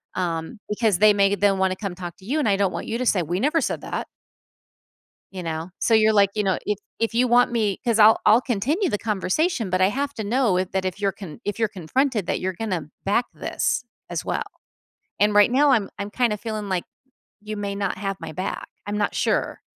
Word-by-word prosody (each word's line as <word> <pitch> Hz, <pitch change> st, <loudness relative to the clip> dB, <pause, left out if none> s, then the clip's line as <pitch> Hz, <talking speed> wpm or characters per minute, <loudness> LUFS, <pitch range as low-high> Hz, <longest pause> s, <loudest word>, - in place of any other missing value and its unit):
um, 170 Hz, +4 st, -3 dB
"because 210 Hz, -2 st, +1 dB
they 210 Hz, 0 st, +7 dB
may 200 Hz, 0 st, +3 dB
they'll 200 Hz, -1 st, +3 dB
wanna 190 Hz, 0 st, +1 dB
come 195 Hz, -4 st, -5 dB
talk 175 Hz, 0 st, -7 dB
to 190 Hz, -, -17 dB
you 275 Hz, +9 st, -1 dB
and 225 Hz, -, +1 dB
I 195 Hz, -, +3 dB
don't 195 Hz, -2 st, +1 dB
want -, -, -4 dB
you 225 Hz, -, -2 dB
to 255 Hz, -, -1 dB
say, 185 Hz, -, +3 dB
'We 175 Hz, +4 st, -2 dB
never 305 Hz, +4 st, +2 dB
said -, -, -1 dB
that.'" -, -, -4 dB, 1.2 s
You 185 Hz, -2 st, -6 dB
know? 165 Hz, +1 st, -4 dB
So, 230 Hz, -, +2 dB
you're 220 Hz, 0 st, +5 dB
like, 200 Hz, -2 st, +4 dB
you 210 Hz, -, 0 dB
know, 190 Hz, -2 st, +1 dB
"If 210 Hz, -1 st, 0 dB, 0.2 s
if 230 Hz, 0 st, -1 dB
you 250 Hz, +2 st, +3 dB
want 245 Hz, 0 st, +4 dB
me 210 Hz, -5 st, 0 dB
'Cause 230 Hz, -2 st, +2 dB
I'll 220 Hz, +1 st, +7 dB
I'll 230 Hz, +3 st, +7 dB
continue 270 Hz, -, 0 dB
the 205 Hz, -, -1 dB
conversation, 220 Hz, -, 0 dB
but 185 Hz, -, +1 dB
I 185 Hz, -, +5 dB
have 280 Hz, +5 st, -2 dB
to 220 Hz, -, -4 dB
know 230 Hz, -3 st, +2 dB
if 185 Hz, 0 st, -2 dB
that 190 Hz, 0 st, -1 dB
if 185 Hz, +2 st, -3 dB
you're 195 Hz, -1 st, +1 dB
con 195 Hz, -1 st, -10 dB
if 205 Hz, 0 st, -3 dB
you're 225 Hz, -2 st, +2 dB
confronted 210 Hz, -, -1 dB
that -, -, -1 dB
you're 185 Hz, 0 st, -2 dB
gonna 180 Hz, -8 st, -3 dB
back 235 Hz, +5 st, +2 dB
this -, -, -1 dB, 0.3 s
as -, -, -3 dB
well. -, -, -1 dB, 0.8 s
And 210 Hz, +1 st, +3 dB
right 205 Hz, +3 st, +6 dB
now, 280 Hz, +2 st, +4 dB
I'm 215 Hz, -6 st, +2 dB
I'm 200 Hz, +1 st, -3 dB
kinda 230 Hz, -3 st, +1 dB
feeling 215 Hz, -2 st, -5 dB
like 185 Hz, -2 st, 0 dB, 0.6 s
you 215 Hz, 0 st, -6 dB
may 200 Hz, -1 st, -3 dB
not 200 Hz, -2 st, -2 dB
have 195 Hz, -1 st, -3 dB
my -, -, -7 dB
back. 185 Hz, +5 st, -4 dB, 0.2 s
I'm 205 Hz, 0 st, -3 dB
not 205 Hz, -, -1 dB
sure." -, -, 0 dB
205 Hz, 230 wpm, -23 LUFS, 190-230 Hz, 1.2 s, they